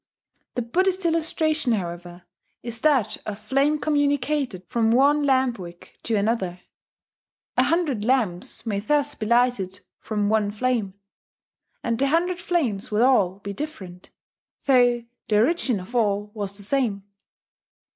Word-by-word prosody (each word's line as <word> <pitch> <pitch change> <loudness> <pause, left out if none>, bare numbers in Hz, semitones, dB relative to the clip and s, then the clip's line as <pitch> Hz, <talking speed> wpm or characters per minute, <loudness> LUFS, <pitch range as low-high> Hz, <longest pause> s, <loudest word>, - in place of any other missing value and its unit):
The 245 - -1
Buddhist 370 +9 0
illustration, 315 -4 +1
however, 175 -2 -5 0.4
is 235 -1 -4
that 255 -8 +2
of 205 -1 -4
flame 275 +8 +1
communicated 285 -8 0
from 230 -2 +1
one 280 +5 +4
lamp 260 -4 +2
wick 175 -1 -11
to 230 - -1
another: 200 -4 -1 0.9
a - - +4
hundred 310 -10 0
lamps 240 -3 0
may 205 -3 -1
thus 290 +6 0
be 215 - -5
lighted 235 -6 +1 0.2
from 210 -2 -1
one 215 -1 +2
flame, 215 -3 -1 0.9
and 230 -1 -1
the 275 - +3
hundred 345 +4 +1
flames 305 - -1
will 215 +2 +2
all 200 -8 +3
be 200 0 -5
different, 190 - -8 0.6
though 245 -3 +4 0.2
the 210 - +2
origin 250 - +2
of 185 +7 -10
all 205 -2 +1
was 200 -2 -5
the 205 - -9
same. 215 -4 0
235 Hz, 135 wpm, -24 LUFS, 205-285 Hz, 0.9 s, one